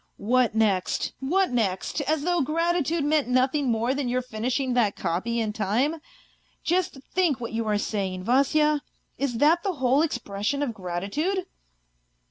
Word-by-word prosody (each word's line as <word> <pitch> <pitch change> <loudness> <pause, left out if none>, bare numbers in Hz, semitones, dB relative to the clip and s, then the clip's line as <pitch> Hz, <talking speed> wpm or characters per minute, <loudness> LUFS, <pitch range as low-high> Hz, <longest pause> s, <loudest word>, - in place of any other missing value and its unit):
" - - -46 0.2
What 250 -3 +3
next, 205 -5 +1
what 360 +7 +1
next! 220 +3 -1
As 310 -1 +1
though 350 +1 +1
gratitude 330 +1 0
meant 295 -1 +2
nothing 260 +2 +2
more 230 +2 +1
than 275 -2 -2
your 250 +1 0
finishing 250 +3 -2
that 225 -5 +2
copy 190 +7 -1
in 215 -2 -1
time? 230 +10 0 0.7
Just 355 -4 0 0.2
think 345 -8 +2
what 235 -2 -5
you 225 0 -2
are 210 -1 +2
saying, 195 -3 -2
Vasya? 285 +5 +3 0.4
Is 270 -4 -1
that 315 +7 +4
the 385 0 -1
whole 265 -1 +2
expression 245 -2 -1
of 250 -5 -2
gratitude 205 - -2
255 Hz, 155 wpm, -26 LUFS, 220-305 Hz, 0.7 s, that